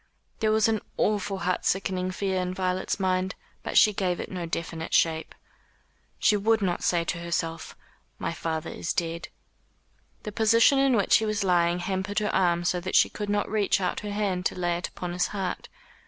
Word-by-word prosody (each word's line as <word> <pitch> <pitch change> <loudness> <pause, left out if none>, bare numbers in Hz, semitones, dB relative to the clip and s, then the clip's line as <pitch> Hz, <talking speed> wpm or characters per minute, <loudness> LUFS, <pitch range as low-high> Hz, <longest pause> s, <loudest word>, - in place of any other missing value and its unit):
There 215 -1 +2
was 220 0 +4
an 220 -2 0 0.2
awful 205 -2 0
heart 180 0 0
sickening 185 -1 0
fear 190 0 -1
in 180 0 -3
Violet's 185 +1 -1
mind, 185 0 0 0.3
but - - -2
she 210 - +7
gave 185 -3 -1
it - - -6
no 180 -3 -4
definite 165 0 -3
shape. 160 -1 +1 0.8
She 210 - +3
would 220 +2 +2
not 185 -4 -1
say 170 -1 +2
to 170 0 -3
herself, 165 -1 -3 0.4
"My - - -3
father 160 -1 -3
is - - -3
dead." 170 0 -2 1.0
The 210 - -5
position 230 +5 +4
in 270 -2 +4
which 200 -4 +4
he 220 - -1
was 215 -1 0
lying 175 -2 +3
hampered 190 +2 -3
her 210 -1 +1
arms 175 -2 +2
so 180 - 0
that 185 +2 -4
she - - +6
could 210 -1 -5
not 205 0 0
reach 205 -2 +1
out 180 -2 -1
her 210 - -6
hand 200 -3 -1
to - - -8
lay 175 -1 0
it 175 - -3
upon 175 -1 -6
his 180 - +1
heart. 195 -3 -4
185 Hz, 195 wpm, -26 LUFS, 175-205 Hz, 1.0 s, she